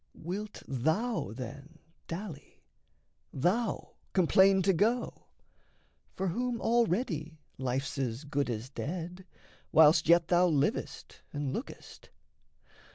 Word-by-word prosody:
Wilt 205 +5 -6
thou, 160 - 0
then, 135 +6 -8 0.3
dally, 170 -3 -8 0.7
thou 195 - -1 0.2
complain 190 +1 +5
to 195 - +4
go? 225 +8 0 0.9
For 190 0 -1
whom 240 +5 -2
already 195 - 0 0.2
life's 130 +2 -2
as 125 0 -2
good 145 -2 -1
as 120 +3 -4
dead, 175 +5 -5 0.4
Whilst 160 0 +6
yet 170 -1 +5
thou 180 0 +5
livest 150 -4 -1
and 145 -2 -3
lookest? 245 - -8
170 Hz, 100 wpm, -31 LUFS, 140-195 Hz, 0.9 s, Whilst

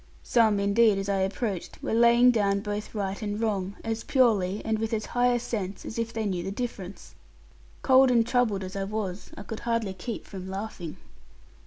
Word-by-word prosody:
Some, 220 -4 +3
indeed, 200 +1 +4
as 195 +1 -3
I 195 -1 +1
approached, 195 0 -2
were - - -2
laying 235 +2 +6
down 200 -3 +1
both 210 +1 -5
right 200 0 -3
and 205 0 -3
wrong, 200 -3 -1
as 225 0 -3
purely, 210 -7 +2
and 220 -1 0
with 225 0 -2
as 215 -1 -1
high 245 0 +1
a 240 - +1
sense, 205 -5 -4
as 225 - -5
if 230 0 -2
they 225 -1 -3
knew 185 -3 -1
the - - -3
difference. 200 -3 -6 0.7
Cold 265 0 +6
and 235 -2 +4
troubled 225 -6 +1
as 185 +1 -7
I 195 0 -2
was, 200 -2 -4
I - - -7
could 220 +1 -6
hardly 230 -4 -1
keep 210 +5 -6
from 190 -2 -8
laughing. 190 -4 -6
210 Hz, 195 wpm, -27 LUFS, 195-230 Hz, 0.7 s, laying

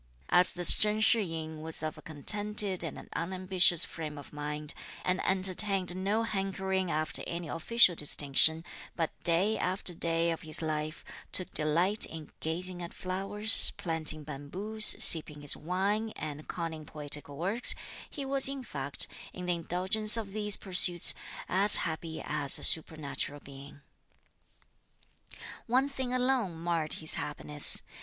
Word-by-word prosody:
As 180 +1 +4
this 175 -1 +5
Chen 210 0 0
Shih 220 +1 +4
yin 160 -4 -7
was 160 0 -6
of 155 -1 -5
a - - -14
contented 200 +4 +4
and 165 - -8
unambitious 185 -1 +2
frame 155 -2 -8
of 145 - -13
mind, 150 0 -5 0.3
and 180 +1 -2
entertained 190 -1 0
no 200 +4 -2
hankering 190 -3 -4
after 155 0 -3
any 170 -1 -6
official 185 +5 +2
distinction, 150 +2 +3 0.3
but 165 -2 -3
day 180 +6 0
after 180 0 -2
day 165 0 -2
of 165 - -6
his 155 -1 0
life 155 0 -5 0.3
took 185 - +2
delight 170 +7 +4
in 160 -2 -11
gazing 175 +3 -3
at 170 - -9
flowers, 195 +4 +2
planting 160 -2 +1
bamboos, 180 +10 +1
sipping 155 -3 +5
his 145 - 0
wine 200 +6 -3
and 150 -1 -8
conning 165 -3 -7
poetical 145 -1 -2
works, 195 - 0 0.3
he 280 - -8
was 270 0 +4
in 275 -1 -7
fact, 140 - -4 0.3
in 180 - -9
the 180 - -1
indulgence 190 +6 +2
of 215 -4 -7
these 210 -1 -1
pursuits, 180 -2 +3 0.3
as 200 +3 +5
happy 160 -1 -4
as 150 -2 0
a - - -4
supernatural 145 -3 +1
being. 140 +1 -14 1.9
One 260 +4 +1
thing 265 -3 -6
alone 250 -8 -2
marred 165 -2 -3
his 155 - 0
happiness. 150 0 +1
175 Hz, 140 wpm, -28 LUFS, 155-195 Hz, 1.9 s, this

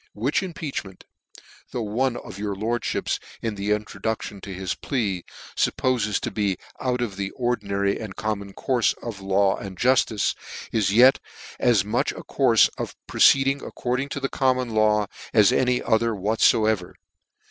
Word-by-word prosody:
" - - -44
Which 120 +8 0
impeachment, 150 - -6 0.7
though 120 - -3
one 120 +4 0
of 100 - -9
your 100 -1 -2
lordlhips, 115 +4 -1 0.2
in 115 -2 -1
the 100 0 -4
introduction 105 -1 -2
to 100 - -8
his 95 -1 -3
plea, 100 - -2 0.3
fup - - +2
pofes 120 -5 +1
to - - -3
be 100 -4 0 0.2
out 125 -1 -1
of 105 -6 -3
the 100 -1 -2
ordinary 100 -5 -1
and 105 -4 -7
common 100 -2 -3
courfe 125 0 +1
of 115 -4 -5
the 95 - -11
law 95 0 +2
and 95 -2 -8
jufli:e, 120 -4 +2 0.4
is 105 -4 +2
yet 125 +5 +6 0.4
as 110 -6 +3
much 110 +3 0
a - - -9
courfe - - +4
of - - -4
proceeding 135 0 +4
according 125 +3 -2
to 140 - -4
the 135 - -1
common 130 -3 0
law, 105 -1 +3 0.3
as 105 -3 +6
any 125 -1 +2
other 115 0 +2
whatfoever. 110 -1 +2
110 Hz, 160 wpm, -24 LUFS, 100-125 Hz, 0.7 s, yet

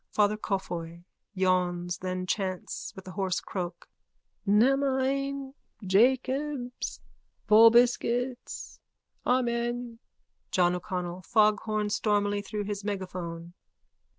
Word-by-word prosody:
_ - - -48
FATHER 210 0 +4
COFFEY: 170 -5 -4 0.3
(Yawns, 180 -2 +1
then 185 0 -3
chants 185 -1 -3
with 190 -1 -11
a - - -6
hoarse 190 -1 -1
croak.) 175 -2 -5 0.6
Namine. 270 +4 +2 0.3
Jacobs. 255 +5 +1 0.5
Vobiscuits. 240 +3 +3 0.5
Amen. 240 -1 0 0.5
JOHN 180 -1 +3
O'CONNELL: 180 -1 -4
_(Foghorns 215 0 +2
stormily 205 -1 +1
through 210 +1 -4
his 205 0 -4
megaphone.) 180 -4 -5
205 Hz, 90 wpm, -28 LUFS, 185-245 Hz, 0.6 s, FATHER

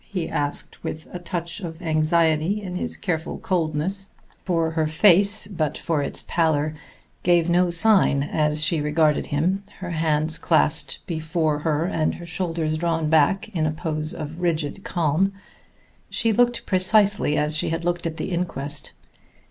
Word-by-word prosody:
he 185 -5 -4
asked 145 0 -4
with 155 +1 -5
a 180 - -5
touch 170 0 -4
of 165 -4 -7
anxiety 160 +3 +2
in 185 -3 -6
his - - -3
careful 165 -5 -3
coldness; 180 +3 -2 0.3
for 165 -3 0
her 160 -1 0
face, 200 +5 +4
but 160 -7 -2
for 160 -4 -1
its 140 - -2
pallor, 155 -2 +1 0.5
gave 175 -1 +3
no 180 +1 +3
sign 170 -5 +4
as 150 +1 0
she 160 -1 +2
regarded 150 0 +1
him, 180 +7 0
her 180 -2 -6
hands 155 -1 0
clasped 75 -1 +1
before 160 -2 -1
her 155 +1 0
and 160 -4 0
her 175 - -9
shoulders 165 -2 -2
drawn 165 -2 0
back 160 +7 +3
in 165 -7 -1
a - - 0
pose 155 0 -2
of 155 +2 -6
rigid 170 +1 -1
calm. 175 +3 +1 0.8
She 225 -1 +1
looked 245 +2 +2
precisely 195 -3 +3
as 150 +1 0
she 155 - +1
had 165 +1 -3
looked 175 -1 0
at 160 -1 -6
the - - -4
inquest. 150 -5 -3
165 Hz, 155 wpm, -23 LUFS, 155-180 Hz, 0.8 s, face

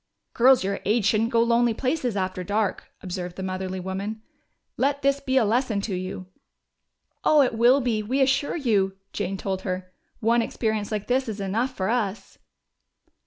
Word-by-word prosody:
"Girls 255 0 +5
your 195 +1 -2
age 215 +1 +1
shouldn't 220 +2 +2
go 230 -1 +3
lonely 235 0 +2
places 255 -4 -1
after 185 -1 -2
dark," 205 +1 -1
observed 180 -1 -5
the 190 - -5
motherly 185 0 -3
woman. 195 +4 -5 0.5
"Let 280 +1 0
this 275 0 +2
be 265 -1 0
a 245 - +4
lesson 230 0 +1
to 200 0 -3
you!" 185 0 -4 1.0
"Oh, 300 -2 +5
it 250 - 0
will 240 +5 +5
be, 230 -4 0
we 250 +6 -1
assure 270 +1 +2
you!" 200 - +1 0.2
Jane 195 - -2
told 190 -1 -3
her. 185 -1 -4 0.3
"One 230 +2 +3
experience 220 -2 -2
like 210 -1 -2
this 255 0 0
is 210 -1 -5
enough 225 +7 -1
for 190 - -1
us." 210 -4 -2
220 Hz, 170 wpm, -25 LUFS, 190-250 Hz, 1.0 s, Girls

